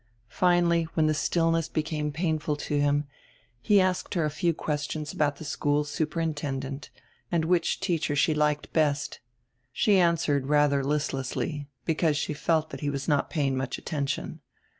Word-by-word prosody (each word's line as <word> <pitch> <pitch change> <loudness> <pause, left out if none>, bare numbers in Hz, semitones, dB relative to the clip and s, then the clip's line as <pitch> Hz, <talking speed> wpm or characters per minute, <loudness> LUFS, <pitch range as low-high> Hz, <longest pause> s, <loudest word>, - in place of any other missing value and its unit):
Finally, 170 +3 +3
when 160 - +3
the 155 - +3
stillness 165 +1 +1
became 155 -1 -2
painful 155 -1 -1
to 145 0 -1
him, 145 0 +2 0.6
he 205 - +4
asked 185 +1 0
her 165 -3 +2
a 150 - -1
few 170 +3 +1
questions 150 -1 -3
about 145 -2 +1
the 160 - -10
school 145 0 0
superintend 150 -2 -2
ent 140 +2 -7 0.4
and 165 -2 +1
which 170 0 +1
teacher 165 -6 0
she 155 +2 +3
liked 150 -1 0
best. 145 -2 +1 0.5
She 200 - +3
answered 160 -6 +2
rather 145 -1 +3
listlessly, 145 +1 -2 0.2
because 160 -2 +1
she 150 - -2
felt 155 +1 0
he 145 - -1
was 140 -1 -4
not 145 -1 +1
paying 140 -4 0
much 130 0 -2
attention. 140 -4 -3
150 Hz, 155 wpm, -27 LUFS, 145-165 Hz, 0.6 s, he